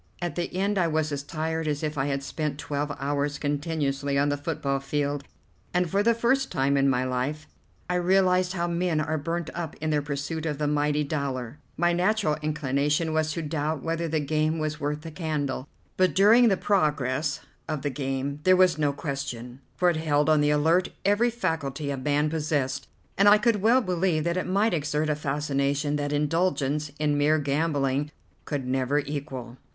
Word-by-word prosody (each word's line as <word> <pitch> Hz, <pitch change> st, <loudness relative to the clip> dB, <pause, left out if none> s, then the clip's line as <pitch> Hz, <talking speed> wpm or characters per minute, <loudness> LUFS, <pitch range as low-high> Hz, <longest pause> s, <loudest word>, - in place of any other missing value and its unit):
At 175 Hz, -3 st, -3 dB
the 175 Hz, +3 st, -3 dB
end 200 Hz, +1 st, +1 dB
I 175 Hz, -, +3 dB
was 155 Hz, -1 st, 0 dB
as 140 Hz, -1 st, -2 dB
tired 160 Hz, +2 st, -3 dB
as 150 Hz, 0 st, -1 dB
if 155 Hz, 0 st, -2 dB
I 135 Hz, 0 st, 0 dB
had 140 Hz, -1 st, -2 dB
spent 150 Hz, 0 st, -3 dB
twelve 145 Hz, 0 st, -3 dB
hours 145 Hz, +1 st, -1 dB
continuously 145 Hz, -2 st, -1 dB
on 145 Hz, +1 st, +3 dB
the 145 Hz, -, +1 dB
football 145 Hz, -2 st, -2 dB
field, 145 Hz, 0 st, -2 dB, 0.5 s
and 180 Hz, 0 st, +3 dB
for 200 Hz, -, +2 dB
the 230 Hz, +2 st, +3 dB
first 260 Hz, +4 st, +1 dB
time 140 Hz, -3 st, +1 dB
in 140 Hz, 0 st, +3 dB
my 125 Hz, -1 st, +1 dB
life 130 Hz, +5 st, -2 dB, 0.4 s
I 180 Hz, -, -1 dB
realized 185 Hz, 0 st, +3 dB
how 175 Hz, -2 st, -1 dB
men 170 Hz, -2 st, 0 dB
are 155 Hz, +1 st, -1 dB
burnt 165 Hz, +2 st, -3 dB
up 170 Hz, -2 st, -5 dB
in 155 Hz, 0 st, -1 dB
their 150 Hz, -1 st, +2 dB
pursuit 145 Hz, +3 st, -3 dB
of 150 Hz, -2 st, -2 dB
the 150 Hz, -, -1 dB
mighty 150 Hz, 0 st, +1 dB
dollar. 140 Hz, -4 st, -3 dB, 0.2 s
My 175 Hz, +1 st, +3 dB
natural 185 Hz, -2 st, +2 dB
inclination 150 Hz, +1 st, 0 dB
was 155 Hz, 0 st, +1 dB
to 165 Hz, -, -3 dB
doubt 155 Hz, -1 st, -2 dB
whether 165 Hz, 0 st, -1 dB
the 160 Hz, 0 st, 0 dB
game 155 Hz, +2 st, 0 dB
was 155 Hz, -1 st, -2 dB
worth 150 Hz, +1 st, -2 dB
the 165 Hz, 0 st, -8 dB
candle, 150 Hz, -5 st, -3 dB, 0.3 s
but 185 Hz, 0 st, +3 dB
during 225 Hz, +5 st, +6 dB
the 195 Hz, -4 st, +3 dB
progress 150 Hz, -7 st, 0 dB, 0.3 s
of 155 Hz, -3 st, -3 dB
the 145 Hz, -, -1 dB
game 135 Hz, +1 st, -3 dB
there 185 Hz, +1 st, +5 dB
was 180 Hz, -4 st, +4 dB
no 145 Hz, -2 st, +2 dB
question, 135 Hz, -4 st, -5 dB
for 180 Hz, -, +2 dB
it 165 Hz, -, -2 dB
held 150 Hz, -1 st, +1 dB
on 155 Hz, -1 st, +4 dB
the 145 Hz, -, +3 dB
alert 160 Hz, +5 st, +3 dB, 0.2 s
every 205 Hz, +4 st, +3 dB
faculty 155 Hz, -, -2 dB
a -, -, -1 dB
man 145 Hz, +3 st, +1 dB
possessed, 145 Hz, -4 st, -1 dB, 0.3 s
and 200 Hz, +1 st, +7 dB
I 210 Hz, -, +8 dB
could 210 Hz, -2 st, +1 dB
well 235 Hz, +5 st, +5 dB
believe 180 Hz, -5 st, 0 dB
that 170 Hz, +1 st, 0 dB
it 185 Hz, -, -2 dB
might 200 Hz, +4 st, +2 dB
exert 150 Hz, -1 st, 0 dB
a -, -, +1 dB
fascination 145 Hz, 0 st, -1 dB
that 145 Hz, 0 st, -2 dB
indulgence 150 Hz, -1 st, 0 dB
in 150 Hz, -1 st, +1 dB
mere 150 Hz, +2 st, +4 dB
gambling 145 Hz, -1 st, 0 dB, 0.4 s
could 145 Hz, -4 st, -3 dB
never 130 Hz, +2 st, 0 dB
equal. 140 Hz, -4 st, -4 dB
150 Hz, 190 wpm, -26 LUFS, 140-170 Hz, 0.5 s, I